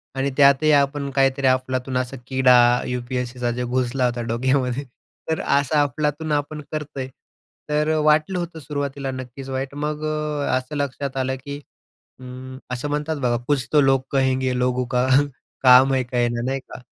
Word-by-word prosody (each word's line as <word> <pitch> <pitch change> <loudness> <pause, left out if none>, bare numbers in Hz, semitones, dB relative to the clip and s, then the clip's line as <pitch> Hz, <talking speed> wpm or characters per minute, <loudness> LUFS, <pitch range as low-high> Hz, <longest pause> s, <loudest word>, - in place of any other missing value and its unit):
आणि 135 +1 0
त्यातही 140 +2 +5
आपण 140 -1 +2
काहीतरी 135 0 +2
अफलातून 130 0 0
असा 130 +1 -3
किडा 130 -1 +5 0.3
यू-पी-एस-सीचा 125 0 -3
जो 125 - -2
घुसला 125 +1 0
होता 120 -1 -1
डोक्यामध्ये. 130 +2 0 0.5
तर 160 +2 0
असं 140 -1 +1
अफलातून 150 +3 -2
आपण 150 +1 -2
करतोय. 145 -4 -4 0.6
तर 150 +1 +1
वाटलं 155 +4 +3
होतं 170 -2 -5
सुरुवातीला 140 -1 -4
नक्कीच 130 +1 -8
वाईट. 135 +1 -4
मग 150 +1 -3
अ, 150 -3 -1
असं 130 +4 -6
लक्षात 140 -1 -3
आलं, 130 0 -1
की 140 0 -5 0.6
हं 130 +1 -9
असं 125 +4 -3
म्हणतात 150 +2 -2
बघा 125 -4 0
कुछ 135 -4 +1
तो 150 - +6
लोग 135 -1 +3
कहेंगे 130 -1 +1
लोगों 125 0 +1
का 125 +1 +2 0.6
काम 130 +1 +7
है 130 - +2
कहना 120 -1 -1
नाही 135 +1 -1
का? - - -11
135 Hz, 155 wpm, -22 LUFS, 125-145 Hz, 0.6 s, काम